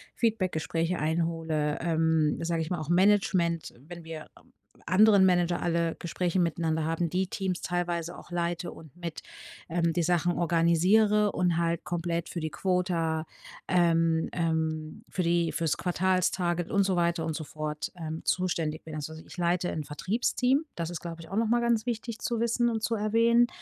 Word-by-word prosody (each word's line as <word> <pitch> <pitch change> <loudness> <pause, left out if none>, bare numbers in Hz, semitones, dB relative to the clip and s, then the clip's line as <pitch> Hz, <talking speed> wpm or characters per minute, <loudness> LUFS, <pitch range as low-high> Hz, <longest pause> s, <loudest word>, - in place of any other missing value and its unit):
Feedback 220 -6 +1
Gespräche 165 +2 -1
einhole, 160 -1 -1
ähm, 160 -2 +2
sage 165 -1 0
ich 160 - -3
mal 175 -3 -2
auch 155 +1 -6
Management, 180 -3 +2
wenn 175 -1 -9
wir 160 -1 -8 0.6
anderen 200 0 +6
Manager 175 -1 +2
alle 170 -1 0
Gespräche 175 +1 -1
miteinander 165 -2 0
haben, 165 +1 -1
die 185 +1 0
Teams 190 -2 -3
teilweise 175 -1 -2
auch - - -14
leite 175 0 -2
und 155 -3 -14
mit, 170 -2 -6 0.5
ähm, 170 -1 +1
die 175 - +1
Sachen 175 +1 +2
organisiere 180 +6 +3
und 175 -2 +1
halt 170 -1 0
komplett 170 -1 -2
für 170 - -4
die 155 0 -2
Quota, 170 -4 0 0.4
ähm, 165 -2 +2
ähm, 160 -2 -2
für 185 - -2
die 170 -1 +2
fürs 165 -3 0
Quartals 185 0 +1
Target 175 -2 -1
und 200 0 +3
so 190 -1 +1
weiter 170 -1 +1
und 160 -1 -2
sofort, 155 -1 -4
ähm, 160 -1 -5
zuständig 165 -4 -1
bin. 155 -1 -8
Also, 155 +1 -5
ich 160 +3 -12
leite 175 +1 +1
'n 155 - -3
Vertriebsteam. 245 - 0
Das 170 -1 -3
ist, 175 - -5
glaube 165 -1 -7
ich, - - -12
auch 195 - -5
noch 230 - +2
mal 240 +2 +2
ganz 235 -1 +1
wichtig 230 -1 -3
zu 235 -1 -2
wissen 235 +1 +1
und 220 -1 -2
zu 225 +1 0
erwähnen. 230 +3 +3
170 Hz, 175 wpm, -28 LUFS, 165-185 Hz, 0.6 s, anderen